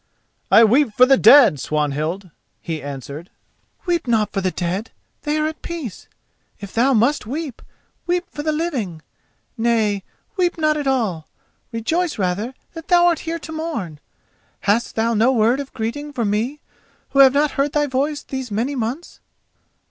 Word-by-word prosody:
"I 230 - +7
weep 240 +3 +4
for 250 - +6
the 270 +1 +5
dead, 250 - +7
Swanhild," 155 +6 -2 0.3
he 160 -2 -5
answered. 140 +4 -7 0.6
"Weep 345 -5 0
not 220 -3 +1
for 195 - -1
the 185 - +1
dead—they 195 - -4
are 305 - +1
at 315 0 -4
peace; 320 - -7 0.5
if 200 -2 -9
thou 255 +3 +3
must 240 +3 +2
weep, 285 0 -5 0.5
weep 355 +1 0
for 295 - -5
the 310 +1 0
living. 255 - -3 0.6
Nay, 220 -4 +1 0.3
weep 355 -2 +1
not 310 -1 +2
at 295 -2 -3
all; 215 -12 -1 0.4
rejoice 315 +9 -1
rather 205 +6 -2 0.2
that 325 -2 -9
thou 350 -1 +5
art 345 -2 +3
here 335 - -2
to 320 0 -10
mourn. 305 - -4 0.6
Hast 210 +4 0
thou 230 +1 +1
no 230 +4 +3
word 235 +1 +2
of 280 -1 -6
greeting 260 +6 -4
for 235 -4 -1
me 230 +8 -1 0.5
who 275 - +1
have 270 -1 +8
not 290 +1 +2
heard 280 +1 -1
thy 295 -1 +2
voice 285 +2 -1
these 265 -2 -5
many 230 +7 -1
months?" 260 +6 -4
250 Hz, 165 wpm, -20 LUFS, 205-295 Hz, 0.6 s, have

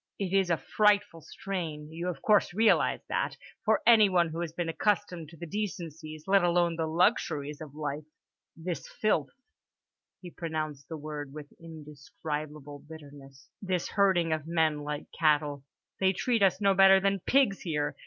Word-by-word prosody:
"It 195 -2 -3
is 195 -2 +2
a 170 - +2
frightful 205 +2 +1
strain—you 160 -2 -5
of 165 -6 -7
course 210 -4 +3
realise 220 +1 +3
that—for 345 - -2
anyone 200 -7 +5
who 160 +1 -6
has 170 -2 -3
been 175 +1 -3
accustomed 175 -1 -1
to 165 - -15
the 170 - -7
decencies, 165 -5 -6
let 195 -1 +4
alone 175 -1 +2
the 160 -1 -2
luxuries, 155 - 0
of 150 -2 -10
life. 150 0 -4 0.5
This 170 +1 -5
filth"—he 205 - -5
pronounced 155 -5 -5
the 160 - -5
word 145 -2 -7
with 150 -1 -10
indescribable 150 -2 -7
bitterness—"this 145 +4 -7
herding 185 -5 +2
of 155 -1 -4
men 160 -3 +1
like 150 0 -5
cattle—they 150 +4 0
treat 230 +4 0
us 190 -1 +3
no 200 -1 +3
better 195 0 +7
than 195 0 +1
pigs 245 -1 +2
here. 150 -4 -2
165 Hz, 145 wpm, -29 LUFS, 150-195 Hz, 0.5 s, better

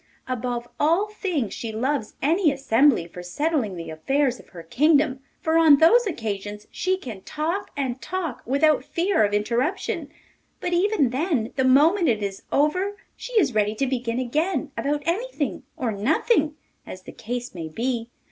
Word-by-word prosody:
Above 245 -1 -3
all 335 +8 +2
things 360 - -2
she 230 - -5
loves 250 +1 -2
any 320 +2 +3
assembly 270 - +3
for 180 +1 -9
settling 240 - -1
the 165 -2 -7
affairs 260 - 0
of - - -16
her 170 -2 -10
kingdom, 285 - +2 0.2
for 320 +1 +2
on 310 -3 +7
those 430 +10 +5
occasions 210 - -4
she 370 +1 0
can 230 - -8
talk 335 - -3
and 260 -2 -2
talk 345 -8 -4
without 290 +4 +2
fear 345 - +1
of 205 - +1
interruption; 235 - -1 0.5
but, 355 - -2
even 350 - +2
then, 265 - -1
the 265 - +1
moment 310 +8 +4
it 215 -3 0
is 195 -1 -4
over 365 +8 +1 0.2
she - - -9
is 350 - +3
ready 210 0 +1
to 270 - 0
begin 245 -3 -2
again 300 +5 -1
about 290 +1 -1
anything 350 - -2 0.2
or 245 -4 -1
nothing, 300 - +1 0.3
as 185 - -10
the - - -10
case 245 +2 -5
may 165 -3 -5
be. 235 +5 -2
275 Hz, 165 wpm, -24 LUFS, 225-325 Hz, 0.5 s, on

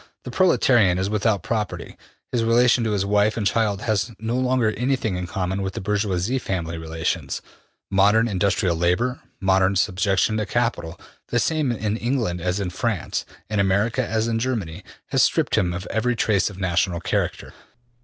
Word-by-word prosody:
The - - -7
proletarian 120 - +3
is 95 +2 -1
without 105 -3 +1
property; 110 -2 -3 0.4
his 120 -2 +1
relation 120 +1 +4
to 110 - 0
his 100 -1 0
wife 105 +2 +2
and 105 - -1
children 105 -2 0
has 110 +1 0
no 115 +2 -3
longer 125 -3 +2
anything 125 -4 -1
in 90 0 -4
common 95 +1 -2
with 95 0 -4
the - - -3
bourgeois 105 +3 -1
family 85 -7 -3
relations; 80 0 -3 0.5
modern 105 +4 +4
industrial 95 -3 +1
labor, 90 +10 0 0.2
modern 95 0 +2
subjection 95 +2 +1
to 105 -1 -2
capital, 110 -8 -1 0.3
the 120 - -1
same 150 +1 +1
in 110 -2 -2
England 115 -8 -1
as 90 +3 -1
in 95 -3 -3
France, 100 -2 -2 0.2
in 105 -1 -1
America 100 +6 +1
as 110 -1 -1
in 115 -1 0
Germany, 105 -8 -3 0.3
has - - +2
stripped - - +2
him 90 - +1
of 90 +3 -5
every 120 +2 0
trace 105 -4 +1
of 100 - -11
national 90 -1 0
character. - - -2
105 Hz, 170 wpm, -23 LUFS, 95-115 Hz, 0.5 s, relation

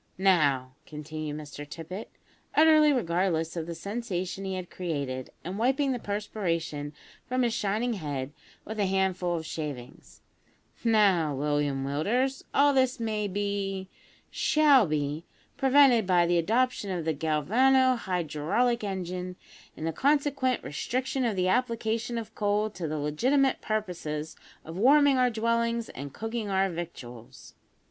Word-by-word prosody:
"Now," 145 -9 +2
continued 150 0 -6
Mr 145 -1 -8
Tippet, 165 +7 -8 0.5
utterly 310 -1 +6
regardless 170 - 0
of 165 -1 -4
the 170 - -5
sensation 195 -1 -4
he 190 0 -3
had 185 -1 -6
created, 140 -7 -4
and 185 +5 -5
wiping 270 +4 +2
the 250 - -2
perspiration 170 -8 -3 0.3
from 255 0 0
his 235 -2 +1
shining 225 +2 0
head 145 -8 -4 0.3
with 220 +1 -6
a 200 - +2
handful 185 -2 0
of 160 -1 -4
shavings; 145 -6 -7 0.6
"now, 195 - +3
William 145 -1 0
Willders, 240 - 0
all 285 +1 +4
this 260 -1 +2
may 215 -2 -1
be, 195 -1 -3 0.4
shall 285 - +4
be, 150 +1 -2 0.3
prevented 265 -6 +5
by 175 -2 +4
the 175 0 +2
adoption 225 +3 +1
of 175 -4 -3
the 160 - +1
galvano 235 - +3
hydraulic 190 +5 0
engine, 180 -2 -4 0.4
and 155 - -5
the 165 - -1
consequent 280 - +1
restriction 255 - -2
of 225 -4 0
the 185 -1 +1
application 230 +1 0
of 220 -1 -6
coal 210 +1 0
to 180 -5 -5
the 155 0 -3
legitimate 255 - +1
purposes 170 -8 -3 0.3
of 160 - -8
warming 280 +3 +5
our 250 0 +4
dwellings 230 0 0
and 140 +1 -7
cooking 225 - -4
our 190 0 +1
victuals. 125 -9 -9
195 Hz, 140 wpm, -28 LUFS, 160-235 Hz, 0.6 s, utterly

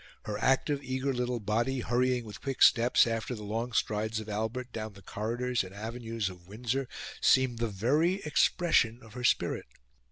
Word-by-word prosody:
Her 105 -1 -4
active, 140 +2 +2
eager 130 +1 -1
little 125 -1 -1
body 120 +5 0
hurrying 125 0 +1
with 105 - -9
quick 135 -2 +1
steps 120 +1 +6
after 115 +1 -2
the 105 - -8
long 115 +4 -3
strides 110 0 0
of 110 - -8
Albert 110 +4 -3
down 110 -1 -5
the 100 0 -15
corridors 120 +5 -1
and 95 +1 -10
avenues 115 0 -4
of 90 -2 -9
Windsor, 120 +5 -2 0.3
seemed 130 -3 +4
the 115 - +1
very 135 - +2
expression 150 -6 +2
of 110 -2 -14
her 125 - -6
spirit. 120 - +1
115 Hz, 170 wpm, -30 LUFS, 110-125 Hz, 0.3 s, steps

